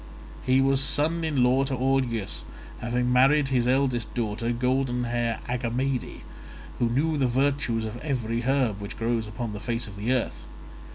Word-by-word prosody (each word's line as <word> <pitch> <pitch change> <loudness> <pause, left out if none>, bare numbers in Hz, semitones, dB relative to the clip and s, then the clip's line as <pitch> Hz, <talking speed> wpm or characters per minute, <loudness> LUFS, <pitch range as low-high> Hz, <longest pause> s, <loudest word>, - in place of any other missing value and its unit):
He 130 +1 +3
was 135 0 +3
son 160 +5 +1
in 145 -6 +1
law 130 +2 +4
to 135 -1 -1
Augeas, 125 -5 0 0.4
having 125 +1 0
married 135 +2 +4
his 125 -2 +1
eldest 130 -3 +1
daughter, 115 0 -1
golden 125 0 0
haired 120 -1 -1
Agamede, 125 +1 -2 0.6
who 120 - +2
knew 150 +5 +1
the 130 - +3
virtues 130 -3 +1
of 110 +2 -5
every 120 -5 -2
herb 120 -5 +1
which 100 - -7
grows 115 -1 -1
upon 110 +1 -5
the 105 - -5
face 115 +2 -2
of 100 -2 -10
the 110 +5 -1
earth. 130 -2 -1
125 Hz, 165 wpm, -26 LUFS, 115-135 Hz, 0.6 s, law